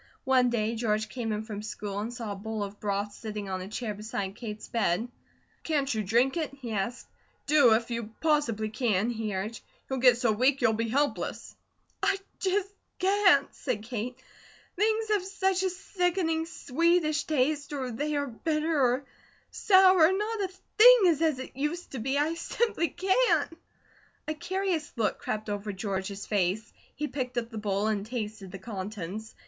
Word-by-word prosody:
One 260 Hz, -2 st, +4 dB
day 225 Hz, -1 st, 0 dB
George 215 Hz, -1 st, 0 dB
came 230 Hz, -1 st, -3 dB
in 210 Hz, 0 st, -2 dB
from 210 Hz, -2 st, -6 dB
school 205 Hz, -1 st, -5 dB
and 220 Hz, +3 st, -3 dB
saw 235 Hz, -3 st, -5 dB
a -, -, -3 dB
bowl 215 Hz, +1 st, -4 dB
of 200 Hz, 0 st, -7 dB
broth 205 Hz, 0 st, -2 dB
sitting 210 Hz, -2 st, -6 dB
on 185 Hz, 0 st, -2 dB
a 185 Hz, -, -6 dB
chair 215 Hz, +1 st, -3 dB
beside 205 Hz, -2 st, -4 dB
Kate's 215 Hz, -2 st, -7 dB
bed. 220 Hz, -1 st, 0 dB, 0.5 s
"Can't 285 Hz, -4 st, 0 dB
you 215 Hz, -1 st, -1 dB
drink 240 Hz, -, +2 dB
it?" 315 Hz, -2 st, -1 dB
he 250 Hz, -4 st, -7 dB
asked. 220 Hz, +4 st, -3 dB, 0.4 s
"Do, 280 Hz, -7 st, +6 dB
if 230 Hz, +1 st, -2 dB
you 230 Hz, -2 st, -3 dB
possibly 265 Hz, -9 st, +1 dB
can," 220 Hz, -1 st, +1 dB
he 220 Hz, -3 st, -3 dB
urged. 210 Hz, +5 st, -4 dB, 0.3 s
"You'll 265 Hz, -1 st, -2 dB
get 245 Hz, -1 st, +6 dB
so 240 Hz, -2 st, +2 dB
weak 260 Hz, +6 st, +3 dB
you'll 225 Hz, -4 st, +3 dB
be 230 Hz, +1 st, -1 dB
helpless." 285 Hz, +5 st, -1 dB, 0.5 s
"I 395 Hz, 0 st, +2 dB, 0.2 s
just 395 Hz, +1 st, 0 dB, 0.2 s
can't," 375 Hz, -7 st, +4 dB
said 240 Hz, -6 st, -3 dB
Kate. 240 Hz, +2 st, -4 dB, 0.6 s
"Things 440 Hz, +3 st, +1 dB
have 415 Hz, -3 st, +2 dB
such 385 Hz, -1 st, 0 dB
a 380 Hz, -, +1 dB
sickening, 355 Hz, -3 st, -1 dB
sweetish 330 Hz, 0 st, +1 dB
taste, 290 Hz, 0 st, 0 dB
or 265 Hz, -4 st, -3 dB
they 295 Hz, +6 st, -2 dB
are 285 Hz, 0 st, 0 dB
bitter, 305 Hz, +4 st, -1 dB
or 255 Hz, +2 st, +2 dB, 0.5 s
sour; 375 Hz, -4 st, +6 dB
not 420 Hz, +3 st, -1 dB
a 390 Hz, -, +1 dB, 0.3 s
thing -, -, +10 dB
is 330 Hz, -4 st, +3 dB
as 315 Hz, -4 st, +2 dB
it 260 Hz, -, -8 dB
used 300 Hz, +6 st, -3 dB
to 265 Hz, -, -5 dB
be. 265 Hz, +5 st, 0 dB
I 300 Hz, +3 st, +2 dB
simply 335 Hz, +1 st, 0 dB
can't!" 380 Hz, -, +2 dB, 0.7 s
A 310 Hz, -, 0 dB
curious 370 Hz, -1 st, -2 dB
look 225 Hz, -4 st, 0 dB
crept 215 Hz, 0 st, -3 dB
over 205 Hz, 0 st, -3 dB
George's 195 Hz, 0 st, -4 dB
face. 205 Hz, +1 st, 0 dB, 0.2 s
He 300 Hz, -, -2 dB
picked 255 Hz, -3 st, -4 dB
up 235 Hz, 0 st, -2 dB
the 220 Hz, -, -5 dB
bowl 205 Hz, -1 st, 0 dB
and 215 Hz, -2 st, 0 dB
tasted 215 Hz, -4 st, -5 dB
the 195 Hz, -, -6 dB
contents. 200 Hz, +1 st, -6 dB
245 Hz, 175 wpm, -28 LUFS, 215-320 Hz, 0.7 s, thing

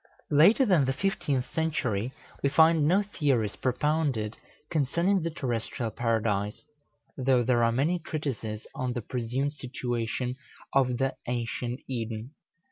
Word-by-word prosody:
Later 175 Hz, -, +6 dB
than 180 Hz, -, +4 dB
the 135 Hz, -, +1 dB
fifteenth 140 Hz, -6 st, 0 dB
century, 130 Hz, -9 st, 0 dB, 0.3 s
we 140 Hz, -, +2 dB
find 160 Hz, 0 st, +5 dB
no 190 Hz, +5 st, +4 dB
theories 140 Hz, -, 0 dB
propounded 130 Hz, -4 st, 0 dB, 0.4 s
concerning 170 Hz, +6 st, +2 dB
the 165 Hz, -, -1 dB
terrestrial 120 Hz, -5 st, -3 dB
Paradise, 110 Hz, -2 st, -1 dB, 0.5 s
though 130 Hz, -2 st, +3 dB
there 120 Hz, -1 st, +3 dB
are 115 Hz, -, +4 dB
many 150 Hz, +9 st, +1 dB
treatises 125 Hz, -9 st, -4 dB
on 125 Hz, -1 st, -2 dB
the 120 Hz, -, -4 dB
presumed 125 Hz, +5 st, -2 dB
situation 125 Hz, -2 st, -3 dB, 0.4 s
of 125 Hz, -2 st, +3 dB
the 135 Hz, +2 st, +1 dB
ancient 120 Hz, +1 st, -2 dB
Eden. 115 Hz, -1 st, -4 dB
130 Hz, 125 wpm, -28 LUFS, 115-150 Hz, 0.5 s, Later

